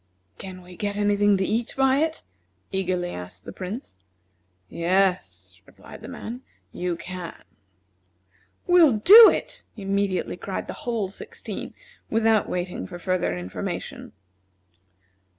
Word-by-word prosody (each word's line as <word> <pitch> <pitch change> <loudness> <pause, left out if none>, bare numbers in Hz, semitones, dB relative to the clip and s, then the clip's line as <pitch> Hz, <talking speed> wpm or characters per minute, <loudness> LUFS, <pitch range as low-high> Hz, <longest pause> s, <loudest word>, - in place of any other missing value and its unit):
"Can 185 -1 -8
we 180 0 -13
get 205 +2 -3
any 205 0 +2
thing 205 0 +4
to 190 - 0
eat 225 +3 -1
by 265 0 +4
it?" 320 +1 -1 0.5
eagerly 185 -2 -1
asked 90 +2 -9
the - - -7
Prince. 190 - -7 0.7
"Yes," 130 - 0
replied - - -14
the - - -9
man, 240 +3 -7 0.3
"you 180 -1 -2
can." 180 0 -7 1.3
"We'll 350 -6 +6
do 415 - +10
it!" - - -3
immediately 195 -2 -1
cried 195 - -4
the - - -6 0.2
whole 220 -5 -1
sixteen, 195 - -8 0.3
without 225 -1 +2
waiting 180 0 -3
for 175 - -8
further 175 - -1
information. 90 +1 -6
190 Hz, 125 wpm, -25 LUFS, 175-220 Hz, 1.3 s, do